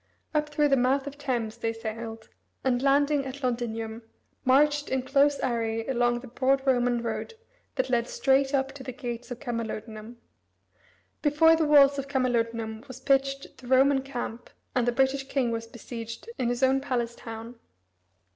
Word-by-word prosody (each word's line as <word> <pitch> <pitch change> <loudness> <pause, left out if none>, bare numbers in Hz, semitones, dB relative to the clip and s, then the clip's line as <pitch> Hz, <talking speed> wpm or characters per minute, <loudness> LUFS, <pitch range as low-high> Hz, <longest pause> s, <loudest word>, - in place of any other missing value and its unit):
Up 300 0 +1
through 295 0 +2
the 275 - +5
mouth 265 +2 +2
of 285 0 -6
Thames 235 -5 -2
they 225 -1 0
sailed, 225 0 -6 0.4
and 250 -2 +1
landing 280 +1 +3
at 270 +1 -7
Londinium, 230 -2 -2 0.4
marched 290 +3 +3
in 260 -1 0
close 280 +2 +3
array 225 -2 -1
along 240 -2 +1
the 260 - -10
broad 265 +2 +1
Roman 245 -2 +2
road 235 - -4 0.4
that 260 -2 0
led 240 -2 +1
straight 270 0 +2
up 270 -1 +1
to 270 -1 -10
the 255 - -6
gates 245 -2 -6
of 245 -1 -6
Camalodunum. 225 -1 -5 1.1
Before 320 +2 +5
the 320 -1 +1
walls 285 -1 +6
of 275 - -4
Camalodunum 230 -4 -1
was 260 -1 -9
pitched 275 0 0
the 250 - -12
Roman 265 +1 +4
camp, 245 -3 -6 0.2
and 245 -2 +1
the - - +4
British 270 +2 +1
king 265 -4 0
was 230 0 -3
besieged 230 - -8
in 240 - +1
his 245 +2 -1
own 265 +1 +4
palace 240 -4 -1
town. 230 +1 -9
255 Hz, 165 wpm, -27 LUFS, 235-275 Hz, 1.1 s, walls